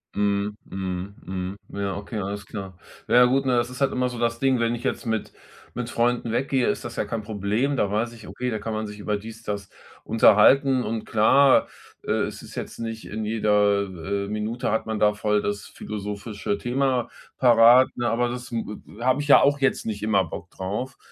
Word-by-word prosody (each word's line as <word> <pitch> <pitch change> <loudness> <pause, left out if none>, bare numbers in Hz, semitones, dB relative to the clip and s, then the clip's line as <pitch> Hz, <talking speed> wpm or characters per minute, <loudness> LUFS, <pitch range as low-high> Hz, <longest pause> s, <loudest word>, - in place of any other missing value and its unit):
Mhm, 100 0 0
mhm, 95 +1 -5
mhm, 95 +1 -4 0.2
ja, 100 -1 -2
okay. 105 +2 -5
Alles 100 0 -4
klar. 95 -3 -8 0.3
Na - - +2
ja, 125 - +8
gut, 135 +2 +2
ne, 125 -2 +3
es 120 0 -1
ist 125 +2 -9
halt 135 - +3
immer 125 0 0
so 125 - -7
das 115 0 0
Ding. 135 -2 +2
Wenn 115 0 +1
ich 120 - -9
jetzt - - -2
mit 110 -1 -2 0.4
mit 120 -1 -4
Freunden 120 -1 0
weggehe, 130 +1 +1
ist - - -2
das 120 0 -6
ja - - -1
kein 115 -2 -3
Problem. 105 +6 -1
Da 100 -6 0
weiß 115 +3 -1
ich: 115 -2 -12
„Okay, 125 0 -3
da 110 - -2
kann 110 +1 -4
man 110 0 -3
sich 105 0 -9
über 105 0 -1
dies 110 +2 -10
das 100 -2 -4 0.4
unterhalten.“ 130 +4 +5
Und 110 -1 -3
klar, 130 +5 +5 0.4
äh, - - -3
es - - -5
ist - - -12
jetzt - - -6
nicht 115 -1 -5
in 110 +1 -4
jeder, 105 -2 +2 0.4
äh, - - -8
Minute 105 +4 -2
hat 110 - 0
man 110 -1 -2
da 105 0 +3
voll 105 0 +1
das 100 0 -3
philosophische 105 0 -5
Thema 125 +2 0 0.3
parat, 120 +1 +7
ne? 120 -1 -1
Aber 120 +1 +1
das 125 0 -6
m 115 -1 -1 0.2
e - - -14
p 115 - -7
habe 130 +3 +2
ich 145 - -5
ja 145 - +8
auch 145 0 +3
jetzt 135 -1 +1
nicht 105 -2 -4
immer 105 -3 +2
Bock 90 - -8
drauf. 105 +10 -5
110 Hz, 215 wpm, -24 LUFS, 105-125 Hz, 0.4 s, ja